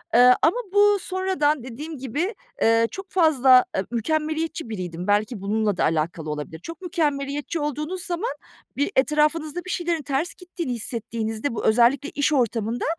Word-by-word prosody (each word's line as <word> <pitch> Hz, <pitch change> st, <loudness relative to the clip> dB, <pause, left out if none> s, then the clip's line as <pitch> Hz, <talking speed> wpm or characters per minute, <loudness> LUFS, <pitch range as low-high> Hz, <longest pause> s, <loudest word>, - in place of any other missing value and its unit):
Iıı, 250 Hz, +1 st, +8 dB
ama 330 Hz, +8 st, +3 dB, 0.2 s
bu 410 Hz, 0 st, +5 dB
sonradan 365 Hz, -7 st, 0 dB
dediğim 290 Hz, +6 st, -7 dB
gibi, 295 Hz, -, -2 dB, 0.3 s
ııı, 230 Hz, 0 st, +4 dB
çok 385 Hz, 0 st, -8 dB
fazla 275 Hz, -8 st, +5 dB, 0.2 s
a 190 Hz, -, +1 dB
mükemmeliyetçi 310 Hz, +3 st, -2 dB
biriydim. 180 Hz, -3 st, -5 dB
Belki 210 Hz, +1 st, +1 dB
bununla 205 Hz, 0 st, 0 dB
da -, -, +1 dB
alakalı 160 Hz, 0 st, -1 dB
olabilir. 150 Hz, +2 st, -5 dB
Çok 330 Hz, -, -9 dB
mükemmeliyetçi 295 Hz, -3 st, -2 dB
olduğunuz 300 Hz, +5 st, -3 dB
zaman, 360 Hz, +8 st, -2 dB, 0.5 s
bir, 285 Hz, -, 0 dB
etrafınızda 305 Hz, +4 st, +1 dB
bir 370 Hz, -, -7 dB
şeylerin 345 Hz, -3 st, -1 dB
ters 280 Hz, +5 st, -2 dB
gittiğini 350 Hz, -7 st, -5 dB
hissettiğinizde 230 Hz, +1 st, -3 dB
bu, -, -, -3 dB
özellikle 245 Hz, +6 st, +4 dB
iş 290 Hz, +1 st, 0 dB
ortamında, 235 Hz, -2 st, 0 dB
280 Hz, 150 wpm, -24 LUFS, 225-330 Hz, 0.5 s, Iıı